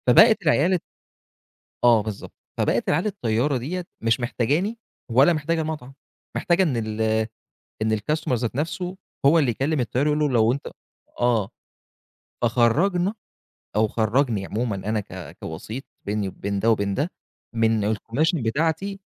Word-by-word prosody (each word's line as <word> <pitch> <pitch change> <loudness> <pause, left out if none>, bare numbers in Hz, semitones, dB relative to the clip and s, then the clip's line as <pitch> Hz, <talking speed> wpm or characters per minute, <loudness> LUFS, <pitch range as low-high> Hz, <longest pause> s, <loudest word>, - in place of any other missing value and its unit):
فبقت 220 - +7
العيال 160 +3 +3
ال 180 - +2 1.0
آه 120 -3 +6
بالضبط، 105 -2 -6 0.2
فبقت - - +1
العيال 165 +6 +2
الطيارة 130 - 0
ديَّة، 170 +9 -4 0.2
مش 115 +3 +2
محتاجاني 145 - 0 0.3
ولا 135 +9 +6
محتاجة 160 +1 0
المطعم، 155 -4 -5 0.4
محتاجة 180 +1 +3
إن 145 -9 0
ال 110 -1 -3 0.8
إن 110 0 +2
الcustomer 155 +7 -2
ذات 120 -1 -1
نَفسه، 175 +5 -3 0.3
هو 160 +4 +6
اللي 135 -6 +2
يكلّم 140 +6 -1
الطيار 125 +3 0
يقول 150 0 +2
له 150 -1 +2
لو 115 -3 +4
أنت 140 +3 -4 0.5
آه، 120 -5 +2 0.9
فخرّجنا، 165 - +2 0.6
أو 110 +1 +3
خرّجني 110 -1 +1
عمومًا 110 +1 -2
أنا 105 +3 -1
ك 100 - -9
كوسيط، 110 +11 -6 0.2
بيني 105 0 -1
وبين 100 +1 -3
ده 115 +3 +3
وبين 100 -2 +1
ده، 145 - -1 0.4
من 115 -2 +2
الكوميشن 120 - 0
بتاعتي، 160 - 0
125 Hz, 140 wpm, -24 LUFS, 110-160 Hz, 1.0 s, فبقت